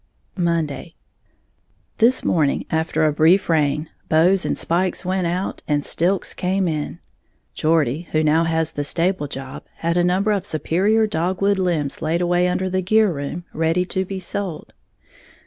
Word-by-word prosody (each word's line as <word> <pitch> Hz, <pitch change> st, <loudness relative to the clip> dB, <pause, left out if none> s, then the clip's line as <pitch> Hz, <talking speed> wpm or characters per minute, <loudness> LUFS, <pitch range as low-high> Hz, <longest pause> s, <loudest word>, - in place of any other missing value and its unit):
Monday. 165 Hz, -2 st, -1 dB, 1.0 s
This 240 Hz, +3 st, +3 dB
morning, 150 Hz, -5 st, +1 dB
after 160 Hz, 0 st, +1 dB
a 155 Hz, -, +2 dB
brief 165 Hz, +6 st, +4 dB
reign, 150 Hz, -1 st, +1 dB, 0.2 s
bows 175 Hz, +4 st, +3 dB
and -, -, -1 dB
spikes 180 Hz, +2 st, 0 dB
went 185 Hz, -1 st, 0 dB
out, 180 Hz, +3 st, -3 dB
and 145 Hz, -1 st, 0 dB
"stilks" 180 Hz, +3 st, 0 dB
came 190 Hz, 0 st, 0 dB
in. 155 Hz, -3 st, -3 dB, 0.6 s
Geordie, 155 Hz, 0 st, 0 dB
who 155 Hz, 0 st, +2 dB
now 160 Hz, +2 st, +3 dB
has 160 Hz, -1 st, 0 dB
the 145 Hz, -, -3 dB
stable 165 Hz, +1 st, 0 dB
job, 135 Hz, -1 st, -8 dB
had 170 Hz, +1 st, -1 dB
a 175 Hz, -, +3 dB
number 190 Hz, +4 st, +2 dB
of 200 Hz, -3 st, 0 dB
superior 195 Hz, +8 st, +1 dB
dogwood 190 Hz, +2 st, 0 dB
limbs 165 Hz, -7 st, -1 dB
laid 160 Hz, +2 st, 0 dB
away 175 Hz, 0 st, +2 dB
under 185 Hz, +1 st, -1 dB
the 185 Hz, 0 st, -1 dB
gear 215 Hz, +1 st, +3 dB
room, 145 Hz, +4 st, -5 dB
ready 165 Hz, +3 st, +1 dB
to 190 Hz, +1 st, -1 dB
be 190 Hz, +1 st, -6 dB
sold. 185 Hz, -2 st, -4 dB
170 Hz, 155 wpm, -21 LUFS, 155-185 Hz, 1.0 s, brief